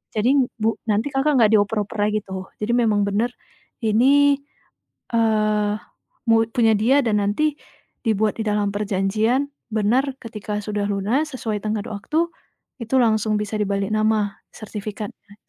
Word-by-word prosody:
Jadi, 250 +4 +3
Bu 225 0 -1
nanti 220 +6 +1
Kakak, 275 +1 +2
enggak 220 -4 +5
dioper-oper 210 0 +1
lagi 215 0 -1
tuh. 190 0 -7 0.2
Jadi, 225 - 0
memang 220 -4 +2
benar 215 +5 0 0.5
ini, 275 +6 +4 0.7
eee, 215 -2 +2 0.6
mu 225 - +6 0.2
punya 225 -2 +4
dia 265 +7 +4
dan 220 -4 +1
nanti 290 +9 0 0.5
dibuat 215 -1 +1
di 220 - -1
dalam 210 -1 +1
perjanjian, 210 +6 0 0.2
benar 245 +6 +1
ketika 210 -2 -5
sudah 205 -1 -2
lunas 230 +10 -1
sesuai 220 -4 -2
tenggat 215 +1 -2
waktu 310 +11 -1 0.5
itu 230 +3 -4
langsung 220 -2 +2
bisa 210 +1 -3
dibalik 200 -1 -1
nama 215 -2 +1 0.2
sertifikatnya. 210 -1 -7
215 Hz, 135 wpm, -22 LUFS, 205-240 Hz, 0.7 s, mu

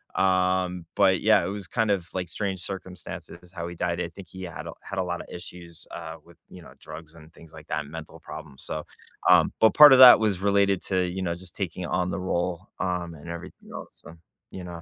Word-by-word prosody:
um, 90 -2 +1
but - - +4
yeah, - - +4
it - - -2
was 100 -1 -6
kind 110 +1 0
of, 90 -4 -1
like, 90 -2 -3
strange 95 -2 -3
circumstances 90 -1 -8
how 85 -3 -6
he 85 - -8
died, 85 0 -2
I 85 - -2
think 90 0 -13
he 95 +1 -9
had 85 -3 -7
a - - -6
had 100 - -8
a 95 - +1
lotta 90 -1 -4
issues, 85 -1 -10
uh, 80 -1 -7
with, 85 0 -20
you 90 - -12
know, - - -14
drugs 80 +1 -11
and 80 -1 -16
things 80 -2 -16
like 80 -1 -13
that, 75 -1 -3
mental 80 +2 -10
problems, 75 -4 -10
so, 75 - -5 0.4
um, 90 -3 +6
but 110 - +5
part 150 -1 +10
of 130 - +7
that 125 -3 +11
was 105 -4 +1
related 100 -1 +2
to, 95 -1 0
you 90 +2 -4
know, 85 -2 -2
just 90 0 -12
taking 90 -2 -4
on 90 +1 -1
the - - -3
role, 90 -1 -2
um, 90 -2 -2
and 80 +1 -13
everything 85 0 -9
else, - - -8
so, 85 - -12 0.4
you 95 - -8
know? 85 -1 -8
90 Hz, 225 wpm, -26 LUFS, 85-95 Hz, 0.4 s, that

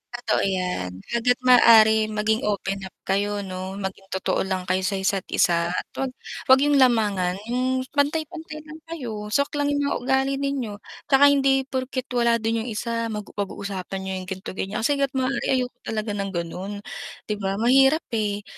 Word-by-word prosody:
Totoo 240 -3 0
yan. 180 - -1 0.2
Hanggat 235 +1 +2
maaring 220 -3 +6
maging 220 +1 +1
open 195 -1 -1
up - - -18
kayo 205 +1 0
'no, 185 0 -6
maging 195 0 -5
totoo 190 - -1
lang 190 -1 -2
kayo 185 - +2
sa 190 +2 0
isa't 190 0 0
isa 170 -1 +3
at - - -1 0.2
'wag 270 -1 -1 0.4
'wag 260 - +8
yung 290 0 +3
lamangan 205 -8 +3 0.2
yung 255 +1 +1 0.2
pantay-pantay 310 +2 -1
lang 310 +1 -10
kayo, 235 -11 -5
swak 280 +5 +1
lang 285 - +1
yung 285 - 0
mga 280 - 0
ugali 265 +2 +1
ninyo. 275 -7 -2 0.4
Tsaka 275 +1 +7
hindi 270 -1 +3
porket 260 0 -3
wala 235 -1 +3
din 225 0 -1
yung - - -7
isa 230 +1 -2
mag 210 -1 -4
pag-uusapan 195 -1 -4
niyo 190 0 -4
yung - - -13
ganto 190 +1 -5
ganyan. 195 +2 -3
Kasi 290 +5 +3
hanggat 275 -1 +1
maaari 260 +1 0
ayoko 250 -1 -4
talaga 215 -1 -2
ng 200 -1 -3
ganon, 175 +3 -4 0.6
'di 210 - -1
ba. 195 0 0
Mahirap, 270 +6 +5
eh, 205 -2 -1
225 Hz, 180 wpm, -24 LUFS, 195-265 Hz, 0.6 s, wag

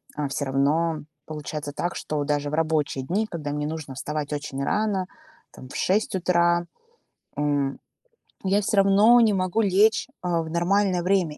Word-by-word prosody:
а 150 -1 -2
всё 145 +1 -2
равно 150 +4 +1 0.3
получается 150 -1 -6
так, 175 +4 -3
что 150 -1 -2
даже 145 0 -1
в - - -8
рабочие 155 -4 0
дни, 195 +11 0
когда 155 -7 -5
мне 150 0 -2
нужно 150 -4 -6
вставать 150 +1 -4
очень 140 -2 -4
рано, 205 0 0 0.4
там, 130 - -12
в - - -10
6 200 +2 +1
утра, 175 -1 +2 0.7
м, 145 -2 0 0.6
я 195 +2 +2
всё 205 +1 -1
равно 200 +5 +6
не 220 -2 +4
могу 185 +3 0
лечь, 205 +4 +3
а, 175 -2 0
в 160 - -7
нормальное 180 +2 +1
время. 180 -5 +1
165 Hz, 165 wpm, -25 LUFS, 145-195 Hz, 0.7 s, равно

